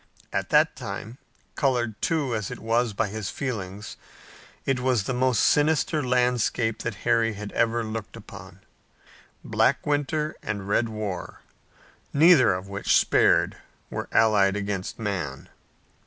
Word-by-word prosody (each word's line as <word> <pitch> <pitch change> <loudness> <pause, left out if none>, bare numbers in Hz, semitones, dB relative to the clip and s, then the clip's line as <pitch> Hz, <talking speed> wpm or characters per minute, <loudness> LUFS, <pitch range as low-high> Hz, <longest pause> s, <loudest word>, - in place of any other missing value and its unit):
At - - -2
that - - +4
time, 115 +5 -7 0.3
colored 120 -6 -1
too, 150 -7 0
as 110 -4 -2
it - - -6
was 115 +1 0
by 100 - -1
his 105 -2 -4
feelings, 105 -6 -5 0.7
it 135 -2 +1
was 125 -4 +1
the 130 - -2
most 125 -1 +2
sinister 155 +1 +2
landscape 125 -2 +1
that 115 -3 -4
Harry 115 -1 +2
had 105 0 -7
ever 115 0 +1
looked 110 -1 -6
upon. - - -12 0.8
Black - - +1
winter 150 +1 -1
and 100 -2 -4
red 115 +3 +1
war, 105 -4 -5 0.7
neither 160 -1 +6
of 90 +1 -3
which 100 +1 +2
spared, - - +3 0.3
were - - -5
allied 100 -3 +4
against 100 -2 -3
man. 90 -11 -4
115 Hz, 135 wpm, -25 LUFS, 105-130 Hz, 0.8 s, neither